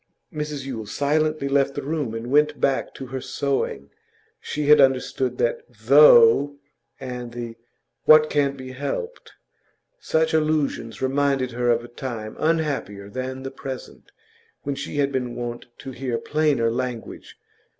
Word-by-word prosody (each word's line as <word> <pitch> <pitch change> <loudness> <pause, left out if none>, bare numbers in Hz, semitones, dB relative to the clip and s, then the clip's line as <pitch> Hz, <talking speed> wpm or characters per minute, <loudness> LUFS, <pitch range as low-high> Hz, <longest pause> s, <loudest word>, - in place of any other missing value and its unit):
Mrs 150 -2 -4
Yule 115 -6 -5
silently 155 +3 0
left 140 0 +1
the - - -4
room, 145 -6 -2
and 115 +2 -5
went 150 +1 +3
back 135 - 0
to 135 - -7
her 130 +1 -5
sewing. 130 - -2 0.5
She 150 0 -4
had 150 0 +7
understood 130 -1 +1
that 120 - +1
'Though 125 +2 +6 0.2
' - - -47
and 125 -2 -6
the 120 -1 -6 0.5
'what 155 0 +7
can't 140 -2 0
be 130 -1 -8
helped.' 145 - -5 0.7
Such 160 +1 0
allusions 155 -7 0
reminded 135 -1 +1
her 120 +1 -1
of 120 0 +2
a - - -9
time 120 -3 -6
unhappier 145 -11 -1
than 130 +2 -5
the 135 - -5
present, 135 -1 -9 0.5
when 140 - -2
she 140 +2 -6
had 140 -1 +1
been 125 -3 -3
wont 120 0 -5
to 135 - -8
hear 125 -2 -3
plainer 145 -5 +1
language. 125 -1 -5
135 Hz, 150 wpm, -23 LUFS, 120-145 Hz, 0.7 s, had